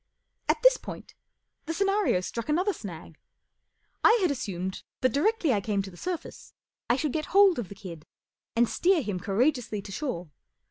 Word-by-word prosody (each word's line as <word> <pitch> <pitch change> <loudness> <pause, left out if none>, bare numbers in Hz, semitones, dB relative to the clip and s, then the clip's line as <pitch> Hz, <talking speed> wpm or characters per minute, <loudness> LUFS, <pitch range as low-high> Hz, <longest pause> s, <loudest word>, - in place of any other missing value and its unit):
At - - +3
this - - +7
point - - -9 0.5
the 330 - -2
scenario 395 - +2
struck 230 +6 -5
another 365 +7 +2
snag. 165 - -9 0.8
I 455 - +7
had 350 - +3
assumed 190 -8 -4 0.2
that 255 -2 +2
directly 330 - +2
I 205 - +1
came 200 -1 0
to 195 - -8
the - - -14
surface 355 - -6 0.3
I 240 - +5
should 280 +1 -1
get 310 -1 -1
hold 395 -7 +7
of 215 - -4
the 200 - -9
kid 175 -6 -10 0.5
and 235 +1 +4
steer 350 +2 +2
him 200 -4 -3
courageously 220 - 0
to 195 - -9
shore. 185 - -4
245 Hz, 175 wpm, -28 LUFS, -, 0.8 s, this